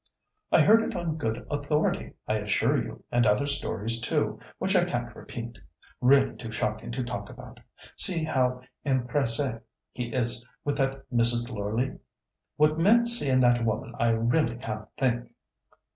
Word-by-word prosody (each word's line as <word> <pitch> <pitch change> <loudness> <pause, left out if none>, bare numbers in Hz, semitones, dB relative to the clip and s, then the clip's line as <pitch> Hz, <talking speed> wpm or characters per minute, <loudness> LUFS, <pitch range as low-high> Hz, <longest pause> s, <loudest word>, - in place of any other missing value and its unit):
"I - - +6
heard 225 +2 +6
it - - -3
on 165 -3 -2
good 115 -7 -3
authority, 145 +1 -1
I - - +1
assure - - +1
you, - - -9
and 120 -2 +3
other 105 +7 +3
stories 115 -5 -1
too, 150 +4 -1 0.2
which 195 +1 0
I 180 - +5
can't 120 -8 -3
repeat—really 115 - -1
too 115 -3 -7
shocking 110 +1 -3
to 130 +1 -2
talk 120 0 -5
about. - - -12 0.4
See 170 -4 +1
how 125 -4 0 0.2
empresse 130 -3 +1 0.3
he 125 - -4
is 120 0 -2 0.2
with 145 - -1
that 135 0 -1
Mrs. 120 0 +2
Loreleigh! 110 +4 -2 0.6
What 155 +1 +3
men 225 +7 +5
see 235 - +4
in 130 0 +4
that 120 -1 +4
women 110 +1 -2
I 120 - +3
really 115 +3 +1
can't 110 -3 -6
think." 120 -3 -1
125 Hz, 155 wpm, -27 LUFS, 115-145 Hz, 0.6 s, I